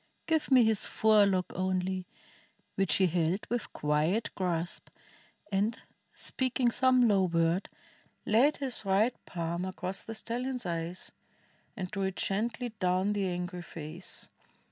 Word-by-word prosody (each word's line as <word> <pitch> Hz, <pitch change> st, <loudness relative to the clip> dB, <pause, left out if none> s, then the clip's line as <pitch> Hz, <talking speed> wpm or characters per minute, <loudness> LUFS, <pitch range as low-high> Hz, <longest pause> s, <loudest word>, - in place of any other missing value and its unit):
Give 320 Hz, -2 st, +1 dB
me 260 Hz, -3 st, +7 dB
his 220 Hz, -2 st, +4 dB
forelock 200 Hz, -4 st, +3 dB
only," 185 Hz, 0 st, -1 dB, 0.7 s
which 195 Hz, -2 st, +2 dB
he 190 Hz, -, +4 dB
held 175 Hz, +2 st, 0 dB
With 240 Hz, -2 st, -2 dB
quiet 155 Hz, +9 st, 0 dB
grasp, 175 Hz, -2 st, -2 dB, 0.6 s
and, 205 Hz, +4 st, +1 dB, 0.4 s
speaking 255 Hz, -1 st, +1 dB
some 255 Hz, 0 st, +4 dB
low 195 Hz, -3 st, +4 dB
word, 170 Hz, +1 st, +1 dB, 0.6 s
Laid 250 Hz, +8 st, +4 dB
his 265 Hz, -5 st, -4 dB
right 200 Hz, +5 st, +3 dB
palm 170 Hz, 0 st, -3 dB
across 185 Hz, 0 st, -5 dB
the 225 Hz, -, -7 dB
stallion's 245 Hz, +1 st, -4 dB
eyes. 170 Hz, +1 st, -3 dB, 0.7 s
And 185 Hz, -2 st, -4 dB
drew 195 Hz, -2 st, -3 dB
it 190 Hz, -1 st, -2 dB
gently 230 Hz, +5 st, -1 dB
down 185 Hz, +2 st, +2 dB
the 200 Hz, -2 st, 0 dB
angry 180 Hz, 0 st, -3 dB
face. 165 Hz, +1 st, -6 dB
190 Hz, 130 wpm, -30 LUFS, 180-225 Hz, 0.7 s, me